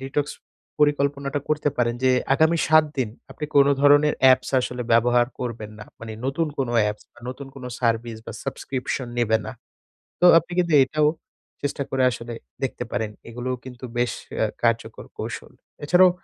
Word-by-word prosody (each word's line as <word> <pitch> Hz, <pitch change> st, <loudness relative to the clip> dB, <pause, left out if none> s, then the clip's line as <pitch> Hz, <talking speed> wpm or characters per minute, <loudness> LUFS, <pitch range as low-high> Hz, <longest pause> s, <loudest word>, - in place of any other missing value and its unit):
Detox 140 Hz, +2 st, -2 dB, 0.5 s
পরিকল্পনাটা 140 Hz, -1 st, +1 dB
করতে 150 Hz, -1 st, +1 dB
পারেন 120 Hz, -1 st, +1 dB
যে, 130 Hz, -, +5 dB, 0.2 s
আগামী 160 Hz, +3 st, +3 dB
৭ 155 Hz, 0 st, +6 dB
দিন 125 Hz, -4 st, +1 dB, 0.2 s
আপনি 150 Hz, -, -6 dB
কোন 140 Hz, -1 st, +7 dB
ধরনের 145 Hz, +1 st, +5 dB
অ্যাপস 130 Hz, -1 st, +5 dB
আসলে 125 Hz, 0 st, -4 dB
ব্যবহার 120 Hz, +1 st, +4 dB
করবেন 115 Hz, -4 st, -5 dB
না। 105 Hz, -, -9 dB, 0.2 s
মানে 115 Hz, -1 st, -7 dB
নতুন 150 Hz, +5 st, 0 dB
কোনো 130 Hz, -3 st, -1 dB
অ্যাপস 105 Hz, 0 st, -2 dB
বা -, -, -20 dB
নতুন 130 Hz, +2 st, -7 dB
কোনো 130 Hz, -2 st, -7 dB
সার্ভিস 115 Hz, -1 st, 0 dB
বা -, -, -6 dB
সাবস্ক্রিপশন 130 Hz, -1 st, -4 dB
নেবে 110 Hz, -2 st, +3 dB
না। -, -, -5 dB, 0.7 s
তো -, -, +6 dB
আপনি 170 Hz, +2 st, -14 dB
কিন্তু 170 Hz, -2 st, +1 dB
এটাও 150 Hz, +3 st, +1 dB, 0.5 s
চেষ্টা 140 Hz, 0 st, -2 dB
করে 135 Hz, -1 st, +1 dB
আসলে 120 Hz, 0 st, -6 dB, 0.3 s
দেখতে 130 Hz, -2 st, -2 dB
পারেন। 110 Hz, -1 st, -2 dB, 0.2 s
এগুলোও 125 Hz, +2 st, -3 dB
কিন্তু 125 Hz, 0 st, -8 dB
বেশ 120 Hz, 0 st, +1 dB, 0.3 s
অ্যা 110 Hz, -, +2 dB, 0.2 s
কার্যকর 115 Hz, -1 st, 0 dB
কৌশল। -, -, -6 dB, 0.3 s
এছাড়াও 180 Hz, +4 st, +6 dB
130 Hz, 165 wpm, -23 LUFS, 120-145 Hz, 0.7 s, কোন